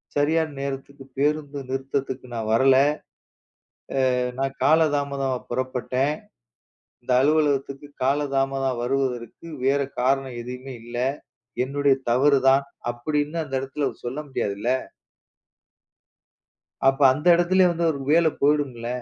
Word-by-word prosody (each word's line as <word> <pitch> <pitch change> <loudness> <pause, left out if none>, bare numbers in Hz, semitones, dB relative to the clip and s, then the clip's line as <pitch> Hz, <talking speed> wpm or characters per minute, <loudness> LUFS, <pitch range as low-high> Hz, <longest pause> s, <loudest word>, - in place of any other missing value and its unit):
சரியான 155 +2 +2
நேரத்துக்குப் 135 0 -7
பேருந்து 145 0 0
நிறுத்தத்துக்கு 135 0 -3
நான் 110 -1 -3
வரல. 130 +3 +5 1.4
அ - - -1 0.2
நான் 135 0 -1
கால 160 +2 +5 0.2
தாமதமாப் 140 -3 -2
புறப்பட்டேன். 130 +2 -1 0.9
இந்த 125 - -4
அலுவலகத்துக்கு 145 -1 +1 0.2
கால 135 +3 +2 0.2
தாமதம் 135 -2 0
வருவதற்கு 125 +2 -2 0.2
வேற 140 +1 +3 0.2
காரணம் 135 -1 0
எதையுமே 125 +2 -7
இல்ல. 120 +1 -7 0.7
என்னுடைய 140 +1 +2 0.2
தவறு 140 +4 +4
தான் 135 +1 +5 0.3
அப்படின்னு 150 +6 -2
அந்த 135 -3 -7
இடத்துல 135 +2 -2 0.2
சொல்ல 125 +4 -4
முடியாது 105 -6 -2
இல்ல. 110 +4 -3 2.2
அப்ப 135 +1 +3
அந்த 150 +5 -7
இடத்துலயும் 180 +1 +3
வந்து 170 0 0
ஒரு 140 - -6
வேலை 165 0 +5
போயிடும்ல? 140 -5 +1
135 Hz, 115 wpm, -24 LUFS, 130-145 Hz, 2.2 s, வரல